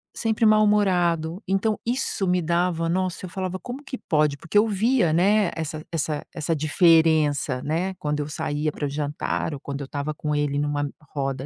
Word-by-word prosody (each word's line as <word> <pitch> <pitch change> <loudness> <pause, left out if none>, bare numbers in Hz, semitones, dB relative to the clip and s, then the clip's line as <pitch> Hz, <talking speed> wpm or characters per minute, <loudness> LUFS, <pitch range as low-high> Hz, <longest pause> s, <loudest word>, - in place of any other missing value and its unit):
sempre 225 0 +1
mal-humorado. 190 -6 +3
Então, 200 +3 0
isso 235 -5 0
me 180 0 +2
dava 170 0 0
Nossa! 185 +1 -1
Eu - - -8
falava: 185 +1 -3
"Como 250 +6 -7
que 265 -2 -6
pode?" 150 -6 +1
Porque 170 +7 -2
eu 210 +2 +5
via, 215 -3 +2
né, 195 +3 +3
essa 155 -1 -4
essa 155 -2 -2
essa 165 0 -1
diferença, 155 -3 +3
né, 175 +5 -1
quando 150 -5 -2
eu 145 - -4
saía 150 +1 -2
pra 145 - -3
jantar 145 +2 -2
ou 140 - -6
quando 140 0 -5
eu - - -4
estava 145 +2 -4
com 150 0 -3
ele 145 -1 0
numa 145 0 -1 0.3
roda 135 -2 -2
165 Hz, 180 wpm, -24 LUFS, 150-190 Hz, 0.3 s, eu